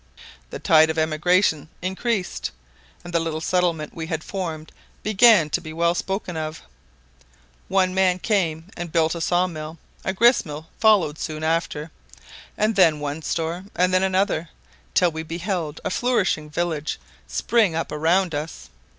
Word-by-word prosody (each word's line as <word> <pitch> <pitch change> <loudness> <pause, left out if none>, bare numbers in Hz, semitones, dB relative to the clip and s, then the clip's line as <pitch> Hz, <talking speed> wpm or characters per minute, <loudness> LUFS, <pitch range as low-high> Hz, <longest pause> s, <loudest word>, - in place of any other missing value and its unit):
The - - -6
tide 160 -1 +5
of 160 - -2
emigration 155 0 +2
increased, 190 +2 -2 0.5
and 175 0 -9
the 170 - +3
little 165 -1 -2
settlement 170 -2 0
we 160 -1 -5
had 160 -1 -3
formed 165 -5 -5 0.3
began 215 -5 +6
to - - 0
be 155 -2 -8
well 170 +1 +2
spoken 190 0 -3
of. 155 0 -5 1.0
One 185 -1 +2
man 185 -1 +3
came 170 -5 0
and 175 -1 -6
built 160 0 +2
a 170 - -5
saw 175 +2 +2
mill; 160 -2 -6 0.3
a - - 0
grist 235 +6 +4
mill 155 -1 -8
followed 200 -9 +4
soon 155 0 -4
after; 160 -1 -1 0.7
and 215 +1 +1
then 160 -6 +5
one 145 +2 -4
store 165 +3 -3
and 180 +1 +2
then 185 - +4
another, 190 -4 +1 0.5
till 180 -2 +4
we 160 0 -5
beheld 165 -1 -3
a 200 - -1
flourishing 190 -10 0
village 160 -1 -2 0.3
spring 215 -8 +2
up 165 - -2
around 165 +4 +2
us. 150 - -6
170 Hz, 155 wpm, -23 LUFS, 155-185 Hz, 1.0 s, began